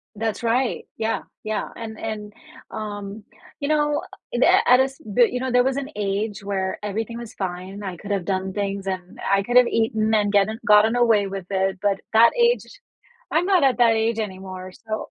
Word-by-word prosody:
That's 220 0 -2
right, 240 +2 0
yeah, 225 0 -1 0.2
yeah, 215 0 -2
and 220 -1 -7
and, 210 -2 -5 0.4
um, 205 0 -6 0.4
you 285 - -2
know, 295 -1 +1 0.3
the - - +2 0.2
at 250 +1 +7
a - - +6
s 270 0 -5
but, 225 +3 +3
you 250 - -2
know, 260 -1 -2
there 250 0 +4
was 265 +1 0
an 280 +1 -4
age 205 +1 -2
where 190 -1 -2
everything 220 +3 -4
was 235 -2 -9
fine, 190 +2 -5
I 185 -3 -5
could 205 - -10
have 195 -3 -1
done 190 0 -2
things 200 -1 -3
and 185 -1 -5
I 195 0 +3
could 245 +4 +2
have 250 -1 +7
eaten 220 -1 +1
and 205 -1 +2
getten 205 +2 +3
gotten 215 +2 +5
away 225 -4 +3
with 195 -2 -6
it, 190 0 0
but 200 -1 +1
that 230 +1 +7
age 480 0 +3 0.7
I'm 335 +3 +2
not 370 -6 +4
at 260 -2 +3
that 235 -2 +5
age 225 0 0
anymore, 185 -3 -6
so, 220 +2 -6
215 Hz, 200 wpm, -23 LUFS, 195-235 Hz, 0.7 s, at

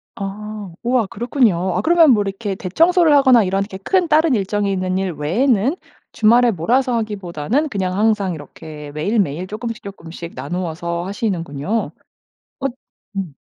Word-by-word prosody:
아 205 0 -6
우와 240 -3 +1
그렇군요. 200 -5 +1
아 - - +1
그러면 330 -3 +5
뭐 215 -4 +4
이렇게 200 +1 -3
대청소를 330 - +3
하거나 260 -5 +6
이런 195 +1 0
이렇게 200 -1 -8
큰 360 - +1
다른 310 -3 +4
일정이 200 0 0
있는 185 -1 -1
일 190 -1 -1
외에는 220 - +1 0.4
주말에 235 +2 +4
몰아서 240 - +1
하기보다는 210 - -2
그냥 190 -5 -2
항상 210 -4 +1
이렇게 150 0 -10
매일매일 175 +1 -1
쪼끔씩 230 +2 -5
쪼끔씩 170 -3 -9
나누어서 170 +4 -3
하시는군요. 190 -2 -2 0.7
엇 275 -1 -2 0.4
음. 190 -7 -4
200 Hz, 345 characters per minute, -19 LUFS, 180-240 Hz, 0.7 s, 하거나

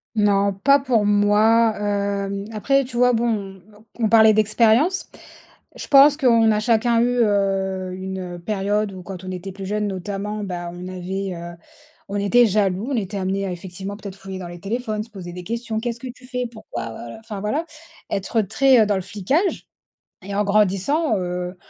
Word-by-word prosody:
Non, 200 -1 +3
pas 275 +9 +4
pour 240 -6 +1
moi, 210 +2 +4
hem, 200 -1 -2
après, 275 +6 +1
tu 245 -1 -6
vois, 250 0 +4
bon, 205 -5 -2
on 210 +1 -20 0.2
on 220 - +3
parlait 220 -1 +7
d'expérience. 225 - +3 0.7
Je - - -7
pense 285 +1 +7
qu'on 230 -5 +4
a 210 - +1
chacun 230 +1 +2
eu, 245 +1 +1
heu, 195 -2 0
une, 190 0 -5 0.2
heu, - - -9
période 205 +2 -1
où 185 - -8
quand 185 0 -8
on 185 - -6
était 185 +1 -6
plus 195 +1 -8
jeune 210 +1 -1
notamment, 200 +2 -4
bah, 175 -2 -5
on 175 +1 -8
avait, 185 +1 -4
heu, 170 0 -8 0.5
on 205 - -2
était 235 +5 +4
jaloux, 200 +1 0
on - - 0
était 200 -1 -3
amenés 195 +1 -1
à, - - -3
effectivement 190 +3 -7
peut-être, 200 -3 -8
fouiller 190 -1 -8
dans 180 - -6
les 175 0 -9
téléphones, 215 +1 -3
se 230 - -17
poser 185 -5 -9
des 180 0 -8
questions, 230 +1 -3
«Qu'est-ce 235 0 -4
que 260 - -7
tu 250 0 -17
fais? 250 -1 -3
Pourquoi, 220 - -7
voilà» 115 +1 -9
enfin 220 -2 -7
voilà, 280 +11 -1 0.5
être 200 +3 0
très 235 +3 +4
dans 205 - +1
le 190 - -1
flicage 210 - -1 0.6
et 200 +1 -6
en 210 - +2
grandissant, 210 - +2
heu, 180 0 -4
205 Hz, 190 wpm, -22 LUFS, 190-230 Hz, 0.7 s, parlait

